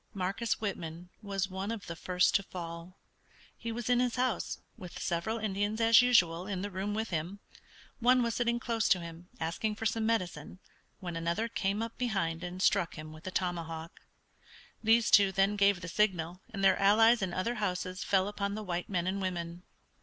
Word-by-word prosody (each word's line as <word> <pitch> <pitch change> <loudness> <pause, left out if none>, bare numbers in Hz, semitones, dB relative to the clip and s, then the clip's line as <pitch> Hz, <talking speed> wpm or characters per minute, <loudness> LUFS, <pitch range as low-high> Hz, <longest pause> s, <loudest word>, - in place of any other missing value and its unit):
Marcus 200 +5 -1
Whitman 175 -4 -5
was 195 -2 -2
one 190 +1 -4
of 225 -3 -4
the 170 - -6
first 180 +2 +2
to 200 - +4
fall. 170 -1 -8 0.6
He 230 - -5
was 230 0 -4
in 245 -1 +3
his 250 -1 +1
house, 255 -1 -1 0.2
with 180 -1 -9
several 175 +7 -1
Indians 210 0 -1
as 230 +1 +7
usual 180 -8 +3
in 190 -2 -3
the 205 - -4
room 195 +3 -3
with 220 -1 -2
him. 170 +5 -3 0.6
One 250 +1 +4
was 235 -1 0
sitting 235 0 0
close 230 -2 0
to 185 - +4
him, 170 +1 -9
asking 170 +7 -2
for 225 - -6
some 220 0 +1
medicine, 180 -8 -2 0.4
when 175 -2 -5
another 170 +7 -1
came 210 -1 -1
up 230 0 -7
behind 190 -9 -1
and 180 +1 -4
struck 170 - +2
him 155 0 -8
with 155 +4 -11
a - - -3
tomahawk. 170 -3 -3 0.8
These 225 +1 +4
two 200 -2 +7
then 195 +2 +2
gave 200 -2 +3
the - - -6
signal, 180 -2 0
and 195 - -4
their 195 - +5
allies 225 +4 +5
in 190 -2 -1
other 185 +7 -1
houses 185 -1 -2
fell 190 -1 +2
upon 200 -1 -3
the 215 - -5
white 175 -2 -3
men 180 -3 0
and 195 +2 -1
women. 175 -2 -3
195 Hz, 190 wpm, -31 LUFS, 175-220 Hz, 0.8 s, as